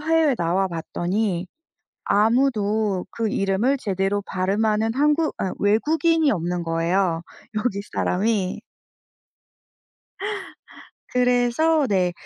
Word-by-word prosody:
해외에 315 -2 +3
나와봤더니 180 +2 -1 0.6
아무도 215 -3 +2
그 225 -2 -2
이름을 200 +9 +1
제대로 200 -2 -1
발음하는 210 +4 0
한국 300 +5 +2
아 190 - -2
외국인이 315 +9 +2
없는 175 -1 -2
거예요, 165 +1 0 0.3
여기 215 -2 -1
사람이. 195 -1 0 2.5
그래서 250 +5 +2
네. 185 -3 +1
210 Hz, 210 characters per minute, -23 LUFS, 185-250 Hz, 2.5 s, 해외에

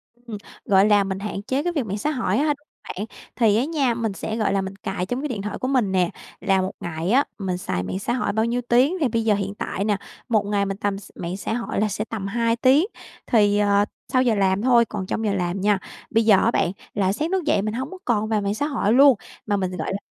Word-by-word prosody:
Ừm, 240 -3 -8 0.3
gọi 195 0 +5
là, 205 -1 +5
mình 190 0 -3
hạn 200 -1 -4
chế 265 +6 -1
cái 350 +1 -1
việc 285 -7 -1
mạng 200 0 -3
xã 295 +9 -1
hội 230 -8 0
á 280 - +2
ha 300 - +3
đúng 290 +1 -19 0.2
bạn. 205 - -5 0.3
Thì 220 -3 +3
á 245 - +2
nha, 285 -6 +1
mình 230 -3 -2
sẽ, 220 +3 -4
gọi 215 -3 +1
là, 195 - +2
mình 190 0 -6
cài 195 -2 -3
trong 245 +7 -3
cái 300 - -2
điện 235 -8 -4
thoại 210 +1 -4
của 255 - -2
mình 250 -7 +1
nè, 180 -2 +2 0.3
là 195 -1 +2
một 185 - -2
ngày 170 +2 -3
á 270 +4 +5 0.2
mình 185 -3 -2
xài 90 - -3
mạng 185 - -3
xã 235 +4 -2
hội 245 -5 -1
bao 220 +1 +1
nhiêu 240 +1 0
tiếng, 260 +9 +4
thì 295 - +2
bây 230 -1 0
giờ 215 -2 +3
hiện 200 0 -3
tại 195 - -3
nè, 205 -1 +1 0.3
một 215 -3 +2
ngày 200 -1 +1
mình 195 0 -3
tầm 205 -1 -1
x 195 - -12
mạng 175 +2 -4
xã 200 - -3
hội 235 -3 -2
là 215 - +3
sẽ 210 +1 -3
tầm 215 -4 -5
2 230 +2 +1
tiếng. 265 +7 +4 0.4
Thì, 205 -3 +4
ờ, 205 0 +3 0.3
sau 255 - +5
giờ 240 -4 +2
làm 195 -1 +2
thôi, 240 -1 +5
còn 205 -3 -5
trong 220 +4 -2
giờ 205 - +1
làm 180 0 -1
nha. 205 0 +3 0.3
Bây 225 0 +2
giờ 215 -3 +7
á 230 - +3
bạn, 175 - +1 0.2
là 195 -1 +1
sáng 310 - -2
thức 380 -2 +1
dậy 250 - +2
mình 215 +1 -2
hổng 260 +7 -4
có 375 - -8
còn 215 -3 +1
vào 215 -1 +1
mạng 200 +1 -1
xã 290 - -1
hội 230 -8 +1
luôn, 275 +1 +7 0.3
mà 205 -2 +1
mình, 185 -2 -1
gọi - - -3
là - - -1
210 Hz, 280 wpm, -23 LUFS, 195-245 Hz, 0.4 s, giờ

